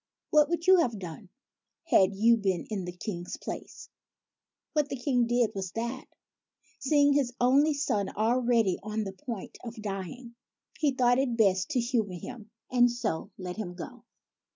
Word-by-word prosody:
What 300 -1 +5
would 340 0 -1
you 375 -1 +7
have 240 -9 +1
done, 180 +1 -8 0.5
had 200 - +4
you 230 +4 +5
been 190 -6 -1
in 195 -4 -2
the 180 - -4
King's 175 -1 -6
place? - - -7 0.9
What 300 -2 +1
the - - -3
King 245 -2 +1
did 240 -1 +2
was 190 -2 -5
that, 235 +3 -4 0.7
seeing 285 +1 +4
his 265 -4 +1
only 280 +5 +4
son 210 -9 0
already 230 -3 +2
on 215 +1 -3
the 195 -2 -5
point 230 -2 -7
of 235 -1 -7
dying, 210 +4 -6 0.5
he 305 -2 +3
thought 250 -2 +3
it 250 -4 0
best 190 -2 +3
to 275 -5 +1
humor 230 -6 0
him; 220 +4 -9 0.2
and 245 -1 +5
so 220 -7 -3
let 180 0 -6
him 180 -5 -5
go. 175 - -9
235 Hz, 165 wpm, -29 LUFS, 195-260 Hz, 0.9 s, you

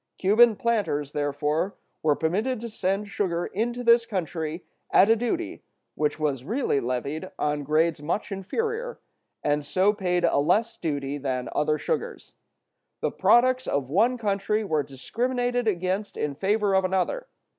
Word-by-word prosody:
Cuban 220 +4 +5
planters, 200 -12 0
therefore, 150 +5 -1 0.3
were 150 -2 +3
permitted 210 - 0
to 235 - -5
send 200 0 -1
sugar 175 -4 -1
into 240 +4 -2
this 235 0 +6
country 165 -4 -3 0.2
at 200 +4 +6
a - - +6
duty 325 +9 -2 0.3
which 150 0 -1
was 140 -5 -1
really 225 - 0
levied 140 +8 -3
on 150 0 0
grades 155 +2 +1
much 170 +8 -2
inferior, 455 - -3 0.4
and 145 0 +1
so 190 +7 +2
paid 180 -4 0
a - - +2
less 225 +10 +2
duty 145 -2 -3
than 130 -2 -2
other 150 0 +1
sugars. 475 - -4 0.7
The - - 0
products 255 +1 +3
of 140 -2 -1
one 230 +9 +3
country 210 0 0
were 155 -7 +1
discriminated 245 - -2
against 190 +1 -1
in 150 -1 -1
favor 200 +5 +1
of 190 0 +4
another. 190 - -1
190 Hz, 145 wpm, -26 LUFS, 150-230 Hz, 0.7 s, this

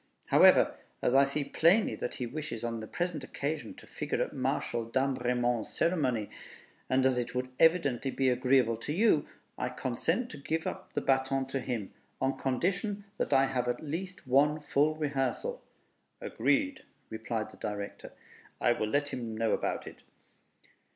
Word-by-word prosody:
However, - - +6 0.3
as - - +2
I 135 +1 +6
see 140 +2 -1
plainly 175 +9 +3
that - - -4
he 125 - -3
wishes 125 -2 -5
on 115 -1 -2
the 110 - -7
present 175 -2 -3
occasion 150 +3 -4
to - - -14
figure - - -3
at - - -7
Marshal 120 - -1
Damrémont's 125 -3 0
ceremony, 130 - 0 0.6
and 130 0 +3
as 130 -2 +3
it 120 - -4
would 125 0 -1
evidently 145 -6 +3
be 135 0 0
agreeable 125 -2 +3
to 145 +6 -4
you, 185 -5 +3 0.3
I - - -1
consent 165 - -1
to 150 - -8
give 160 +3 -2
up - - -5
the - - 0
baton 135 0 +1
to 135 - -1
him, 120 -6 -4 0.3
on 135 0 0
condition 195 - -1 0.2
that - - -1
I 135 -1 +5
have 125 -2 -1
at 120 +3 -2
least 175 +4 -5
one 145 +4 +3
full 150 +1 +1
rehearsal." 150 - -2 0.6
"Agreed," 280 -1 0 0.3
replied 110 0 -3
the - - -15
Director; 100 -1 -5 0.5
"I - - +3
will 110 -2 0
let 145 +3 +1
him 115 -5 -5
know 115 -1 +1
about - - -1
it." - - -11
135 Hz, 165 wpm, -30 LUFS, 120-155 Hz, 0.6 s, However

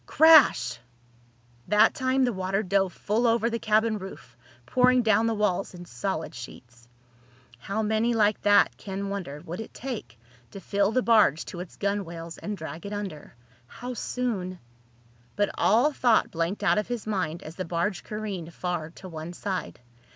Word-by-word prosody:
Crash! 290 - +6 0.9
That 210 +2 +5
time 260 0 +1
the 245 - 0
water 190 +2 -1
dove 195 -1 +1
full 220 +7 0
over 230 0 +2
the 230 - -2
cabin 220 0 +2
roof, 185 -10 -10 0.3
pouring 250 - +4
down 220 0 +3
the 225 - 0
walls 195 -3 -1
in 175 0 -9
solid 175 -2 -4
sheets. 120 -1 -11 0.7
How 200 - -2
many 220 +2 +1
like 210 -1 +2
that, 205 0 +4
Ken 195 0 -5
wondered, 170 -6 -6
would 175 +3 -6
it 225 - -10
take 220 - -6 0.3
to 195 - -9
fill 200 +2 +1
the 255 +2 +1
barge 215 -10 +4
to 175 - -8
its 180 -1 -9
gunwales 170 -5 -3
and 210 -1 -5
drag 165 +2 -7
it 205 - -6
under? 195 -11 -6 0.3
How 245 - -7
soon—? 215 -8 -3 0.8
But 205 0 +1
all 240 +9 +3
thought 240 -4 +3
blanked 170 +5 -2
out 205 - +3
of 210 - -3
his 240 -3 -4
mind 185 -6 -2
as 155 - -9
the 185 - -3
barge 175 +3 -2
careened 200 -6 -5
far 175 -3 -3
to 185 +3 -12
one 165 0 -7
side. 185 -7 -4
200 Hz, 165 wpm, -27 LUFS, 175-220 Hz, 0.9 s, Crash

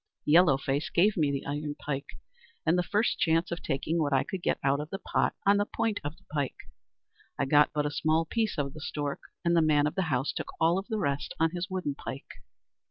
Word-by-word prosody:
"Yellow 155 -2 +6
Face 140 +3 -1
gave 200 +4 +3
me 150 -5 +2
the 140 - -3
iron 145 +1 -3
pike, 140 -1 -5 0.5
and 160 - +4
the 180 - +3
first 210 +5 0
chance 165 +1 +2
of 170 0 -3
taking 155 +5 -1
what 145 -3 +1
I 135 - +3
could 190 -3 -5 0.2
out 140 +1 +2
of 150 +1 -5
the 195 - -4
pot - - 0
on 200 +1 +5
the 205 - +2
point 220 -2 -1
of 145 +2 -5
the - - -24
pike. 145 -3 -1 0.8
I 135 - +1
got 145 +2 +5
but 150 -1 -1
a 145 - -1
small 155 +2 +1
piece 220 +2 -1
of 140 -2 -2
the 155 - -10
stork, 145 -1 -3 0.3
and 170 0 +3
the 165 - +5
man 150 -2 +3
of 150 - 0
the 190 - 0
house 130 0 0
took - - -4
all 170 +3 +3
the 220 +2 -4
rest 140 -8 -2
on 165 0 +3
his 180 +2 -4
wooden 185 -6 -2
pike. 135 0 -8
155 Hz, 230 wpm, -29 LUFS, 145-175 Hz, 0.8 s, Yellow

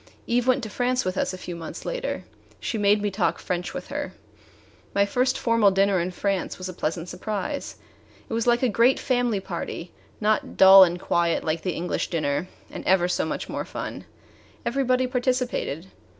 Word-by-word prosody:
Eve 240 +1 +1
went 255 0 +3
to - - -3
France 250 +2 0
with 185 0 -1
us - - 0
a 185 - -6
few 180 -1 -7
months 165 -1 -8
later. - - -3 0.4
She 225 - -3
made 205 0 +3
me 205 - 0
talk 190 -1 0
French 180 -1 -3
with - - -7
her. - - -4 0.8
My 200 0 +4
first 250 +5 +1
formal 230 -3 +4
dinner 195 0 +3
in 175 +1 -1
France 195 +1 -2
was 185 - -5
a 185 - -6
pleasant 165 0 -3
surprise. 215 +10 -4 0.5
It - - -6
was 230 +1 0
like 240 +1 +3
a - - +5
great 235 +4 +3
family 245 -5 +1
party 175 -2 -6 0.3
not 215 0 0
dull 190 0 +10
and 175 -1 +1
quiet 170 -1 +1
like 160 +1 -1
the 185 - -2
English 175 +1 -2
dinner, 155 0 -1 0.2
and - - -7
ever 185 -1 +4
so 180 - 0
much - - -4
more - - -3
fun. - - -6 0.6
Everybody 255 0 +1
participated. 250 - -1
200 Hz, 185 wpm, -25 LUFS, 180-245 Hz, 0.8 s, dull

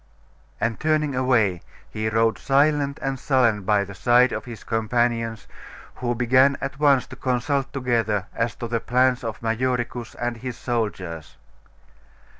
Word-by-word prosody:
And 115 -1 -1
turning 155 -2 +1
away, 120 -8 +2 0.3
he 110 0 -2
rode 115 0 +1
silent 140 0 +2
and 135 -1 -2
sullen 120 -7 +2
by 100 +1 +2
the 100 0 -9
side 120 +5 +4
of - - -4
his 120 -3 -9
companions, 115 0 -1 0.5
who 120 -1 -1
began 130 +3 +4
at 135 +1 -5
once 140 -4 +4
to - - -11
consult 135 +2 -1
together 115 -6 0
as 115 +1 -1
to 120 - -5
the 115 0 -1
plans 125 +1 +2
of 115 0 -5
Majoricus 120 0 -2
and 120 -1 -3
his 125 0 -6
soldiers. 95 -9 -4
120 Hz, 145 wpm, -23 LUFS, 115-130 Hz, 0.5 s, side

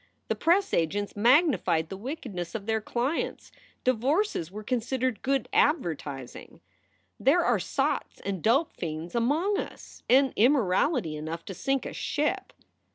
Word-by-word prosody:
The - - +1
press 375 +4 +2
agents 200 +5 0
magnified 225 - +3
the - - -5
wickedness 205 - -6
of 205 -3 -4
their 220 0 0
clients. 250 +8 -2 0.3
Divorces 255 - +1
were 210 +2 -7
considered 250 0 -1
good 270 0 0
advertising. 155 - -1 0.6
"There - - +3
are - - +3
sots - - -1
and 190 -3 -3
dope 270 - +2
fiends 160 0 -5
among 300 - +1
us, - - -8
and 265 +1 +5
immorality 225 - +2
enough 160 +2 -5
to 195 - -6
sink 270 +8 -1
a - - -5
ship." 300 +7 -2
235 Hz, 135 wpm, -28 LUFS, 180-275 Hz, 0.6 s, and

